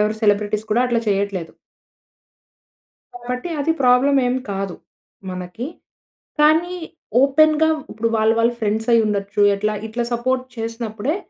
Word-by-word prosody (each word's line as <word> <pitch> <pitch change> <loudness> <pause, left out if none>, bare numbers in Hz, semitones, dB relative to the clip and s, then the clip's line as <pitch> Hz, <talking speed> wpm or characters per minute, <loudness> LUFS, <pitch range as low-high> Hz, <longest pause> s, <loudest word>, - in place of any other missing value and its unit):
ఎవరు 210 +1 +1
సెలబ్రిటీస్ 210 0 +1
కూడా 225 +3 +3
అట్లా 240 -1 +1
చేయట్లేదు. 195 -4 -1 1.6
కాబట్టి 250 +6 -5
అది 320 +3 +2
ప్రాబ్లమ్ 255 +3 +4
ఏమి 250 +1 0
కాదు 195 -2 -3 0.6
మనకి. 185 +6 -6 0.7
కానీ 320 +4 +4 0.5
ఓపెన్‌గా 310 +3 +4 0.2
ఇప్పుడు 225 +2 -1
వాళ్ళ, 220 0 +3
వాళ్ళ 230 +1 +3
ఫ్రెండ్స్ 220 +1 -1
అయ్యి 230 -1 +5
ఉండొచ్చు, 200 0 -1
ఎట్లా 210 +2 -1
ఇట్లా 235 +2 -3
సపోర్ట్ 255 +2 0
చేసినప్పుడే, 230 +3 -3
230 Hz, 120 wpm, -20 LUFS, 210-255 Hz, 1.6 s, అయ్యి